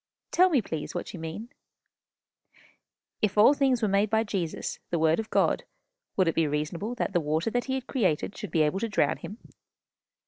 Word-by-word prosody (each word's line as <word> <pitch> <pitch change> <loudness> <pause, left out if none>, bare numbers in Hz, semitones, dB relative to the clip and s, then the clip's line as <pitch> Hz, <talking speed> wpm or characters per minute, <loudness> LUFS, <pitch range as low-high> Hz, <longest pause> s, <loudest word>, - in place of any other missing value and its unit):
"Tell 365 +1 +5
me, 280 -10 +2
please, 160 -3 -5
what 175 - -4
you 180 - -7
mean." 165 +9 -6 1.7
"If 210 -1 0
all 220 +7 +7
things 265 -4 +1
were - - +4
made 200 +1 +2
by 220 0 +2
Jesus, 190 -7 -3
the 170 - 0
Word 160 +2 +3
of 220 0 -4
God, - - +2 0.5
would 185 -3 +3
it 165 - +2
be 165 -2 +2
reasonable 160 +10 -3
that 225 - -2
the 175 - +2
water 160 +7 -1
that 245 +1 0
he 265 - -1
had 260 -2 -4
created 195 - 0
should 210 - -6
be 160 - +2
able 150 +5 0
to 230 - -2
drown 200 - +1
him?" 205 - -8
200 Hz, 200 wpm, -27 LUFS, 165-230 Hz, 1.7 s, all